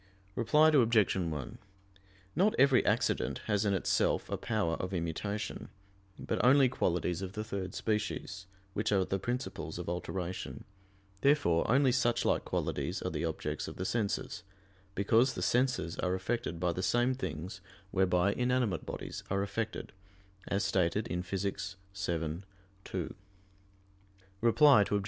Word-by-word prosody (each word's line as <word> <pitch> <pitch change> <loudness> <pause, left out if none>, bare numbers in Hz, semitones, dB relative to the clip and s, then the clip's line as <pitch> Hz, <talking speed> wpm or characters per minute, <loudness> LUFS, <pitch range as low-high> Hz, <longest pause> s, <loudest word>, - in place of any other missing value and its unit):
Reply 150 +8 +4
Obj. 115 -8 +4
1: 80 -7 -3 0.8
Not 195 +7 +3
every 135 -1 +5
accident - - +1
has 105 -1 +1
in 100 -1 +2
itself 95 - +1
a - - +1
power 80 -1 0
of 95 +1 -3
immutation 90 +5 -3 0.5
but - - -2
only 130 +2 +6
qualities 90 -5 0
of 95 -1 -5
the 105 - -3
third 100 -3 -5
species, 105 -3 -2 0.3
which 105 - -1
are 95 -2 +3
the 95 - -1
principles 125 +6 -4
of - - -6
alteration: 90 +1 -4 0.6
therefore 135 - +3
only 130 +2 +5
suchlike 120 -1 +1
qualities - - -2
are - - -2
the - - -2
objects - - -3
of - - -7
the 95 - -4
senses; 105 -1 -1 0.5
because 115 +6 +3
"the - - -3
senses 125 -8 +1
are 90 0 +1
affected 95 -3 -2
by 90 -1 +1
the 90 - -3
same 120 +6 +2
things 95 - -5 0.3
whereby 95 0 +2
inanimate 125 -4 0
bodies - - -6
are 100 +1 +1
affected," 105 +2 -4 0.5
as 100 +1 0
stated 95 +2 +1
in 90 +1 -1
Phys. 95 +1 -3 0.2
vii, 85 -3 -2 0.4
2. - - -4 1.3
Reply 130 +1 +6
Obj. 105 - +2
100 Hz, 140 wpm, -32 LUFS, 90-120 Hz, 1.3 s, only